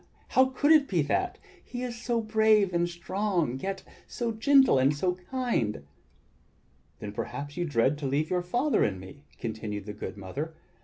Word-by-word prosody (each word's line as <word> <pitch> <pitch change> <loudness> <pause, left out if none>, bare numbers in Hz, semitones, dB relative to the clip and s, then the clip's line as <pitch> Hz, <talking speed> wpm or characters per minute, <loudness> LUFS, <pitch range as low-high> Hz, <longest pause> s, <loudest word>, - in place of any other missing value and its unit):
How 260 - +5
could 260 +3 +1
it 305 -3 +6
be 175 -5 +1
that? 370 - -1 0.3
He 245 0 -6
is 245 -1 -4
so 235 -1 0
brave 215 -3 +3
and 175 0 +1
strong, 175 - -1
yet 195 +4 -4 0.2
so 235 -1 -2
gentle 265 - +5
and 135 +3 +3
so 180 +5 0 0.2
kind!" 235 - -1 1.1
"Then 105 - -6
perhaps 145 +7 -5
you 175 0 -1
dread 145 0 +1
to 140 - -2
leave 145 +5 0
your 180 -1 +2
father 245 +12 +1
and 95 -3 -1
me," 140 +11 -12
continued 105 -3 -5
the 105 - -6
good 105 - -7
mother. 140 - -5
175 Hz, 170 wpm, -28 LUFS, -, 1.1 s, it